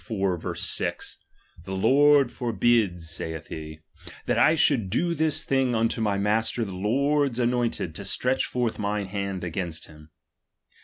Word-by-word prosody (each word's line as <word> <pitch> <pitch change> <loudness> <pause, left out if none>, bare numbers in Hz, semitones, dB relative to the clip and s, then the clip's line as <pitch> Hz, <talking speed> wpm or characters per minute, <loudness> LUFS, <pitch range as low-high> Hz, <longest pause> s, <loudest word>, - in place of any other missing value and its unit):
6): 95 -7 -2 0.5
The 95 +2 -6
Lord 140 +5 +4
forhid, 115 -5 +1
Eaith 80 -1 -5
he, 80 0 -8 0.4
that - - +1
I 160 - +5
should 130 -10 +2
do 170 - 0
this 160 -2 +1
thing 130 -3 +1
unto 115 +1 0
my 105 -2 +1
master 110 +3 0
the 95 - -7
Lord's 135 +7 +1
anointed, 120 -8 0
to 100 - -7
stretch 125 +7 0
forth 120 -3 -2
mine 105 0 -1
hand 100 -1 -4
against 85 -2 -3
him. 75 0 -16
110 Hz, 140 wpm, -25 LUFS, 95-125 Hz, 0.5 s, I